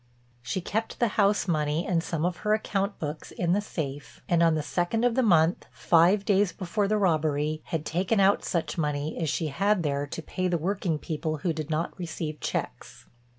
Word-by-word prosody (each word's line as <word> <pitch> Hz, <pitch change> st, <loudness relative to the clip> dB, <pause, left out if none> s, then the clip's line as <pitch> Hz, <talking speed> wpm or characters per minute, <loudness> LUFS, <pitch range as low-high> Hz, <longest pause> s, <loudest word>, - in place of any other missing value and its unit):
She 125 Hz, +10 st, -3 dB
kept 220 Hz, +5 st, -3 dB
the 235 Hz, -, +3 dB
house 205 Hz, -1 st, +2 dB
money 155 Hz, 0 st, 0 dB
and 170 Hz, -3 st, +1 dB
some 165 Hz, -2 st, -2 dB
of 180 Hz, -2 st, -1 dB
her 210 Hz, +4 st, +2 dB
account 200 Hz, -2 st, -2 dB
books 150 Hz, 0 st, -5 dB
in 175 Hz, -2 st, -1 dB
the 205 Hz, -, +2 dB
safe 145 Hz, -8 st, -6 dB
and 170 Hz, -1 st, +3 dB
on 165 Hz, -1 st, +4 dB
the 155 Hz, -, -1 dB
second 175 Hz, +9 st, -1 dB
of 245 Hz, -, +3 dB
the 260 Hz, -, +2 dB
month—five 175 Hz, 0 st, +3 dB
days 200 Hz, -2 st, +3 dB
before 195 Hz, +4 st, -1 dB
the 215 Hz, +1 st, +2 dB
robbery—had 155 Hz, -3 st, 0 dB
taken 185 Hz, +7 st, 0 dB
out 195 Hz, +1 st, +4 dB
such 170 Hz, -1 st, -2 dB
money 150 Hz, 0 st, -1 dB
as 160 Hz, -, 0 dB
she 155 Hz, +1 st, -1 dB
had 195 Hz, +5 st, +1 dB
there 145 Hz, -1 st, -1 dB
to 160 Hz, -, -6 dB
pay 185 Hz, +3 st, -2 dB
the 175 Hz, -1 st, +1 dB
working 180 Hz, -1 st, -1 dB
people 155 Hz, 0 st, -3 dB
who 170 Hz, -, +2 dB
did 155 Hz, -1 st, -5 dB
not 160 Hz, +2 st, -1 dB
receive 160 Hz, -3 st, -4 dB
checks. -, -, -5 dB
170 Hz, 195 wpm, -27 LUFS, 155-195 Hz, -, on